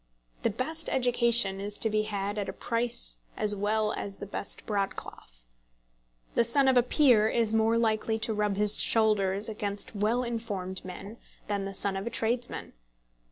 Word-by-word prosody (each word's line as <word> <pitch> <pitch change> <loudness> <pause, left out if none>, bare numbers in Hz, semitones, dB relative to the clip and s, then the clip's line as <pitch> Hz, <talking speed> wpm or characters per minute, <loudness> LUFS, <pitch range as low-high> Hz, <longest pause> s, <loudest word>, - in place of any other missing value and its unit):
The - - +1
best 315 +9 -2
education 235 -5 +2
is 205 +1 -5
to - - 0
be 215 -1 +1
had 205 -1 -3
at 200 - -3
a - - -5
price 230 - -1 0.2
as 210 -1 +2
well 215 +2 0
as 200 -1 -6
the - - -7
best 200 0 -7
broadcloth. 195 - -5 0.9
The - - +3
son 265 +4 +3
of 260 - +4
a 245 - +6
peer 245 -4 +4
is 225 -2 +1
more 225 +1 +3
likely 220 -1 0
to 220 0 -1
rub 210 -1 0
his 210 +1 +6
shoulders 210 -2 +2
against 205 -1 -5
well 220 +5 +1
informed 205 -6 -4
men 195 +4 -9 0.3
than 200 -1 -2
the 195 0 -6
son 195 0 +1
of 195 +3 -4
a - - 0
tradesman. 235 +1 -2
215 Hz, 170 wpm, -28 LUFS, 200-235 Hz, 0.9 s, a